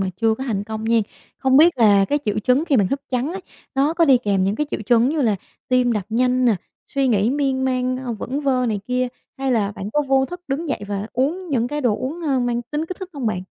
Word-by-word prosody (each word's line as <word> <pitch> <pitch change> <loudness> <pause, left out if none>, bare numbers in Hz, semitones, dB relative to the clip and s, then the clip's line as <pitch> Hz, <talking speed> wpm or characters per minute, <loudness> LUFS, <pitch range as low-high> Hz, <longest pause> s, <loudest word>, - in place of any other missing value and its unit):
mà 190 -1 -1
chưa 225 +2 +2
có 265 - -6
thành 205 -6 -2
công 220 0 -5
nhen. 225 0 +3 0.4
Không 265 -1 +3
biết 325 -1 +6
là 205 -4 +5
cái 290 +8 0
triệu 210 -1 0
chứng 250 +7 +2
khi 300 -5 +2
bạn 200 -5 +3
thức 275 - -2
trắng 260 +5 -1
á, 385 - -5 0.3
nó 280 +3 +2
có 335 0 +4
đi 270 -5 +5
kèm 200 -5 +1
những 195 +2 +1
cái 300 - -1
triệu - - -3
chứng 240 0 +4
như 300 0 0
là 215 -5 +2 0.3
tim 250 -1 +3
đập 210 -3 -1
nhanh 250 +2 +2
nè, 230 -5 +4 0.3
suy 275 -1 0
nghĩ 220 0 +2
miên 270 -2 0
man, 255 -1 0
ơ, 255 -2 -4
vẩn 255 +6 -4
vơ 260 -3 +1
này 210 -3 -1
kia 250 0 0 0.3
hay 270 -1 0
là 210 -4 +1
bạn 200 +1 -6
có 295 - +2
vô 265 0 +4
thức 355 +3 -8
đứng 285 +4 -2
dậy 260 - -2
và 205 0 -3
uống 325 +9 -1
những 245 -5 0
cái 295 +1 -3
đồ 235 -6 +1
uống, 300 +7 -5
ơ, 275 -5 +1
mang 240 -1 -1
tính 300 +6 -4
kích 370 - -6
thích 375 - -5
hông 275 -5 -4
bạn? 185 -4 -1
255 Hz, 270 wpm, -21 LUFS, 220-280 Hz, 0.4 s, biết